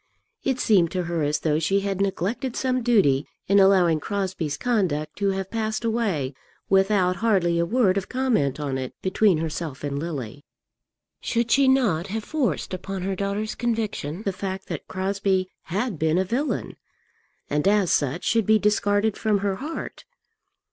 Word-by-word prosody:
It 265 -2 0
seemed 185 -8 +4
to 180 -1 -1
her 170 -1 -2
as 145 0 0
though 155 -1 +1
she 195 +5 +1
had 195 -1 -2
neglected 215 +7 -1
some 255 -1 0
duty 195 - +3 0.2
in 200 +1 +5
allowing 185 -5 +5
Crosbie's 185 -5 -3
conduct 180 - 0
to 200 -1 +2
have 190 -1 -3
passed 220 0 -2
away 200 - 0 0.4
without 190 -2 +3
hardly 175 -6 +2
a 170 - +1
word 200 -3 +3
of 190 - -10
comment 235 - 0
on 135 -3 -2
it 130 -1 -6
between 190 -1 +3
herself 160 -3 -4
and 140 -1 -2
Lily. 145 -5 -5 0.8
Should 235 -1 -1
she 275 -1 +5
not 215 -11 +2
have 220 +2 -3
forced 285 -9 -1
upon 185 0 -4
her 195 0 -1
daughter's 200 +3 -2
conviction 215 -7 -2
the 195 - -1
fact 190 0 -5
that - - -5
Crosbie 190 0 0 0.2
had 200 - -2
been 160 +1 +2
a 190 - +2
villain, 255 +10 -2 0.7
and 150 +4 0
as 200 -3 +3
such 145 +4 0
should 225 -4 +1
be 220 0 +6
discarded 205 0 +1
from 215 -2 +1
her 195 -1 0
heart? 305 +9 -6
195 Hz, 165 wpm, -24 LUFS, 165-220 Hz, 0.8 s, be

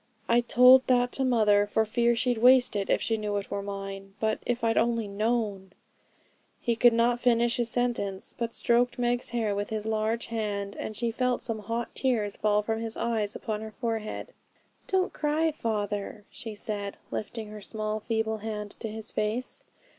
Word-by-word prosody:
'I 235 +1 +4
told 250 +2 +6
that 245 -1 +3
to 270 - 0
mother 210 -5 +4
for 220 +1 +1
fear 235 +2 +2
she'd 245 0 0
waste 250 0 +6
it 200 -1 -1
if - - +2
she 225 - 0
knew 210 -1 -2
it 200 - -5
were 200 - -2
mine. 195 -1 -7
But 220 -1 0
if 245 -1 -1
I'd 225 0 +2
only 230 -2 +1
known 205 -2 -1 0.4
' - - -38
He 235 - 0
could 240 +1 +6
not 235 +1 +2
finish 240 -1 +2
his 240 -1 0
sentence, 230 -6 -1
but 230 -1 -3
stroked 240 +1 +2
Meg's 245 0 0
hair 225 -3 0
with 205 0 -3
his 215 -1 -3
large 220 +1 0
hand, 205 -3 -3
and 215 - -5
she 230 +1 0
felt 250 +1 0
some 225 -3 -2
hot 230 +3 -4
tears 225 -6 0
fall 210 0 +2
from 225 +1 -2
his 225 -1 -4
eyes 220 -3 -1
upon 215 -3 -4
her 220 - -6
forehead. 225 0 -4 0.5
'Don't 380 -1 +1
cry, 310 +2 +1
father,' 210 -4 -3
she 220 -2 -7
said, 205 -1 -4
lifting 220 0 -5
her 210 0 -9
small 215 +1 -2
feeble 220 0 -1
hand 210 -1 -5
to - - -4
his 220 +1 -1
face. 220 +4 -2
225 Hz, 185 wpm, -28 LUFS, 210-240 Hz, 0.5 s, told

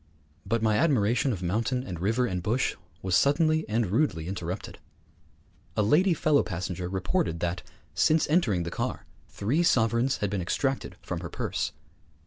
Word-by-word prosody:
But 115 +2 0
my 110 -1 +3
admiration 130 -4 +2
of 95 -6 -4
mountain 115 +8 0
and 90 -8 -6
river 110 +7 +1
and 90 -6 -2
bush 115 +8 0 0.3
was 95 -2 +1
suddenly 155 - +3
and 115 +2 +1
rudely 105 - +1
interrupted. 90 0 -5 1.0
A 105 - +3
lady 170 - +4
fellow 150 -2 +3
passenger 90 -1 -4
reported 90 -3 -1
that, 90 +1 -1 0.3
since 155 - +3
entering 120 - +2
the 85 - -5
car, - - -3 0.2
three 125 +12 0
sovereigns 120 -3 +2
had 100 -2 -2
been 100 -2 -1
extracted 135 +9 -1
from - - -4
her - - -6
purse. - - -2
110 Hz, 155 wpm, -27 LUFS, 90-135 Hz, 1.0 s, lady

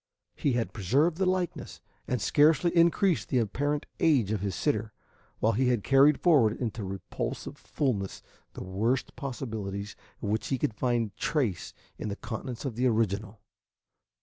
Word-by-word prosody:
He 140 - 0
had 120 -1 -1
preserved 140 - +2
the 190 - +2
likeness, 185 -2 -2 0.3
and 125 - 0
scarcely 155 +3 +3
increased 170 +1 +3
the 130 - +1
apparent 145 +6 0
age 135 - +3
of 105 -3 -1
his 100 -2 -2
sitter, 110 -7 -1 0.4
while 110 - +2
he 125 +4 +1
had 120 -5 +1
carried 140 +2 +5
forward 135 -11 +4
into 115 -3 -3
repulsive 95 0 -5
fullness 105 -9 -2 0.3
the - - -7
worst 110 +8 -1
possibilities 110 -7 -5 0.3
of 105 - -1
which 110 +1 -1
he 135 - 0
could 115 - -1
find 120 -2 -1
trace 125 - -1 0.2
in 105 - -3
the 100 - -3
countenance 115 +4 -6
of 135 - -2
the 125 +3 +1
original. 110 -2 -1
120 Hz, 155 wpm, -28 LUFS, 105-145 Hz, 0.4 s, carried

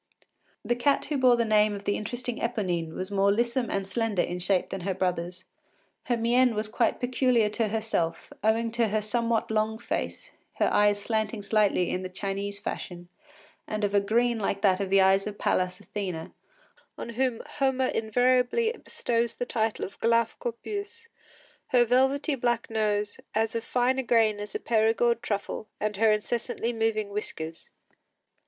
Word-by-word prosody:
The 240 - +1
cat 275 +4 +2
who 295 - -1
bore 250 -1 +6
the 235 -1 +1
name 210 -1 +3
of 200 - -8
the 205 - 0
interesting 245 +2 -4
Eponine 180 -9 -2
was 185 +2 -5
more 200 0 +3
lissome 235 +3 0
and 195 -1 -2
slender 205 -2 0
in 180 +1 -4
shape 180 +1 +1
than 195 - -4
her 190 +1 -2
brothers. 180 0 -2 0.6
Her 240 - +1
mien 240 +1 +3
was 215 +1 -1
quite 230 +2 0
peculiar 245 -3 +2
to 215 +1 0
herself, 215 -6 -2
owing 225 +1 +2
to 235 0 +1
her 215 +1 0
somewhat 230 +1 0
long 220 0 +1
face, 235 - -4 0.2
her - - +1
eyes 205 0 +4
slanting 215 0 -2
slightly 200 -3 +2
in 185 - -2
the 185 - -5
Chinese 200 +2 -4
fashion, 175 -3 -6 0.6
and 215 0 -3
of 205 0 0
a 200 - +4
green 235 +3 +1
like 200 -1 -2
that 190 -2 +4
of 195 -1 -2
the 195 0 +5
eyes 195 +1 +4
of 205 -1 -6
Pallas 180 0 0
Athene, 180 -6 -5 0.6
on - - -6
whom 245 0 -1 0.2
Homer 265 -1 +2
invariably 250 - +2
bestows 235 -1 -1
the 245 - -3
title 225 -3 -1
of 195 - -12
γλαυκῶπις, 400 - -2 0.6
her 245 -1 +4
velvety 265 +5 +2
black 240 -3 -1
nose, 210 -2 0
of - - -16
as 220 +1 +1
fine 250 +2 +1
a - - 0
grain 225 -3 +3
as 205 0 -7
a - - 0
Perigord 230 +1 +2
truffle, 210 -1 -3
and 210 -1 -2
her 220 +1 +4
incessantly 230 +2 -1
moving 225 -2 0
whiskers. 165 -5 -6
220 Hz, 170 wpm, -27 LUFS, 200-240 Hz, 0.6 s, bore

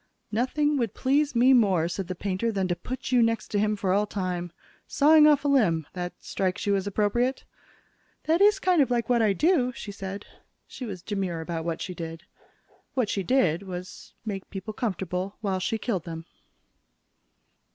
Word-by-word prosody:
"Nothing 290 +6 +1
would 235 -6 -1
please 280 +1 +1
me 250 +3 +6
more," 195 -9 +3
said 185 +1 -4
the 185 - -4
painter, 200 +5 -1
"than 195 -3 -1
to 175 - +1
put 255 +7 -6
you 250 -1 +5
next 230 -1 +1
to 205 - 0
him 210 +1 +1
for 195 -2 0
all 205 +2 +2
time. 180 -3 -3 0.4
Sawing 305 +1 +6
off 290 -1 +4
a - - +3
limb 180 - +3
that 180 -1 -4
strikes 190 0 -2
you 200 -1 +2
as 195 0 -2
appropriate?" 220 +6 0 0.8
"That 330 +4 +2
is 415 0 +6
kind 365 -4 +3
of 270 - +2
like 235 -2 0
what 240 -2 +3
I 210 -3 +3
do," 300 - +2
she 210 - -7
said. 195 0 -6 0.4
She 255 - -8
was 185 -5 -7
demure 190 -5 -2
about 160 0 -4
what 165 -1 -2
she 185 - -5
did. 165 -1 -7 0.7
What 250 -6 +1
she 200 - -1
did 185 - +2
was 185 -2 -8
make 195 -3 -5
people 200 +2 -6
comfortable 190 -3 -3
while 195 -3 -1
she 225 +4 -1
killed 205 -6 -2
them. 165 -1 -7
205 Hz, 185 wpm, -26 LUFS, 185-250 Hz, 0.8 s, me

